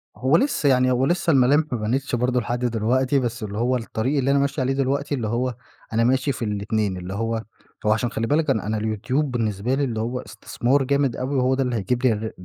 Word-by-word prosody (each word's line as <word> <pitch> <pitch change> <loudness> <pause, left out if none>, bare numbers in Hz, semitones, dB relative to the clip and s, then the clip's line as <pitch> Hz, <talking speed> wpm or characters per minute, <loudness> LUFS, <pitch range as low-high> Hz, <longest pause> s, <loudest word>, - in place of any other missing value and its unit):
هو 130 +8 +3
لسّه 250 - +1
يعني 130 -1 +3
هو 125 +1 +2
لسّه 175 0 +1
الملامح 140 +3 +4
ما 125 - 0
بانتش 125 +5 -1
برضو 125 +1 +1
لحد 120 +2 -2
دلوقتي، 125 +4 +1
بس 120 -2 -3
اللي 105 0 -5
هو 125 +3 +1
الطريق 120 +4 -2
اللي 135 +1 +2
أنا 140 - +3
ماشي 140 0 0
عليه 130 +1 +1
دلوقتي 140 +2 0
اللي 120 -5 -3
هو 120 +2 -1 0.4
أنا 115 - +2
ماشي 130 +3 +2
في 125 -2 -4
الاتنين، 105 -1 -1
اللي 90 +1 -6
هو 115 +2 -2 0.4
هو 105 - +4
عشان 115 +2 -1
خلِّ 115 +1 -2
بالك 150 +2 +1
أنا 110 -6 0
أنا 110 - -1
اليوتيوب 125 +7 -1
بالنسبة 115 0 -1
لي 140 - 0
اللي 115 -5 -2
هو 120 +3 -2
استثمار 130 +1 -1
جامد 140 -1 +1
أوي، 130 +3 -3
وهو 130 0 +2
ده 135 - +1
اللي 125 -2 -1
هيجيب 120 +4 -1
لي 120 - +5
الرا 110 +1 -4
125 Hz, 230 wpm, -23 LUFS, 110-135 Hz, 0.4 s, لي